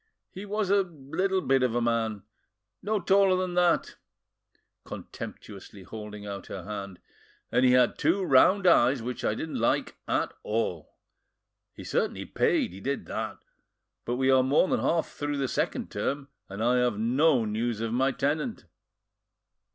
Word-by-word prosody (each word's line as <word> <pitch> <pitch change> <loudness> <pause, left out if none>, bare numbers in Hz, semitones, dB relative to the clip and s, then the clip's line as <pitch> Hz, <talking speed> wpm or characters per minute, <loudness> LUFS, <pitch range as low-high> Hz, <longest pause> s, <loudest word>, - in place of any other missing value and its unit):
He 195 +2 -8
was 205 -1 -1
a 200 0 +5
little 180 +3 -2
bit 135 -5 +2
of 125 -2 +1
a - - +2
man, 115 -3 -1 0.6
no 210 +2 0
taller 195 +1 +4
than 185 -1 -2
that,"—contemptuously 110 - -5
holding 105 +1 -8
out 100 -1 -7
her 95 - -7
hand,—"and 100 +4 -5
he 125 -1 +5
had 125 -1 +3
two 195 - +2
round 185 +7 +4
eyes 130 -7 +4
which 125 0 -5
I 105 - +1
didn't 160 +5 -4
like - - 0
at, - - 0
all. 105 -7 -3 0.8
He - - -9
certainly - - -1
paid, - - +1
he 95 - -9
did 140 +4 -3
that, - - -4 0.7
but 120 - -2
we 130 +1 +2
are 130 0 +6
more 135 +7 +3
than - - +1
half 165 -1 +1
through 145 0 -4
the 135 -1 0
second - - -2
term 140 0 -3 0.2
and 100 +3 -4
I 125 +2 +3
have 125 -4 +1
no 125 +3 +3
news 110 +1 -2
of 115 0 -2
my 135 +3 +2
tenant." 150 - -2
130 Hz, 155 wpm, -27 LUFS, 110-170 Hz, 0.8 s, are